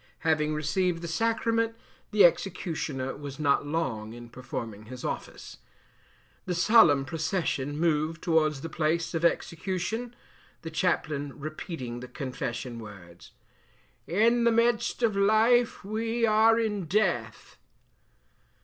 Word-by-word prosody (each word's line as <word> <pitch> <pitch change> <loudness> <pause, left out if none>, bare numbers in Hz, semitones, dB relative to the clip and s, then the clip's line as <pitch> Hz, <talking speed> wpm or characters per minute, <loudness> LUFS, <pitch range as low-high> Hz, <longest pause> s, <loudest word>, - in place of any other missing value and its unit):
Having 155 -1 +1
received 165 +3 0
the - - -3
sacrament, 230 +4 0 0.3
the 205 -3 +6
executioner 160 -7 -1
was 140 -1 -8
not 145 -1 +2
long 125 -9 -2
in 120 0 -10
performing 115 -4 -7
his 125 +2 -8
office. - - -6 0.9
The 180 - -1
solemn 175 -8 +5
procession 150 -2 -2
moved 160 -1 0
towards 155 -4 +2
the 165 - -4
place 165 +2 -1
of 165 0 -2
execution, 190 +8 -1 0.5
the 165 - -6
chaplain 150 -4 -1
repeating 145 -5 -6
the 125 - -8
confession 125 -2 -5
words, 95 -6 -12 0.7
"In 230 +7 +3
the 235 - +4
midst 235 +1 +1
of 220 -3 +2
life 220 +3 +3
we 225 +3 0
are 220 +1 +4
in 210 -5 -1
death." 210 +7 -1
165 Hz, 120 wpm, -28 LUFS, 140-215 Hz, 0.9 s, the